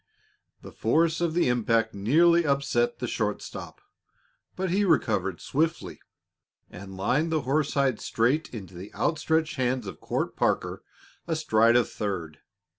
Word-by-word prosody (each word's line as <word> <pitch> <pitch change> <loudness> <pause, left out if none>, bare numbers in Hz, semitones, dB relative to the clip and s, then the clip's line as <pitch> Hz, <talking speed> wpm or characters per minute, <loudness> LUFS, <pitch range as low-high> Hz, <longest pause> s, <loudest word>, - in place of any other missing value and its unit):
The - - -10
force 165 +8 +1
of 170 -2 0
the 175 - +3
impact 115 -2 +1
nearly 170 +12 +4
upset 145 - 0
the - - -4
short - - -1
stop, 405 - -9 0.7
but 185 -1 -2
he 200 +3 +2
recovered 110 - +1
swiftly 160 +3 -2 0.7
and 95 +1 -10
lined 150 - 0
the 155 -1 +1
horsehide 140 -3 0
straight 130 +8 0
into 95 -6 -9
the 90 +4 -9
outstretched 160 -1 0
hands 125 -2 0
of 95 -5 -8
Court - - -3
Parker, - - 0 0.5
astride 115 -8 +3
of 120 -1 +4
third. 90 -7 -5
130 Hz, 135 wpm, -26 LUFS, 110-160 Hz, 0.7 s, nearly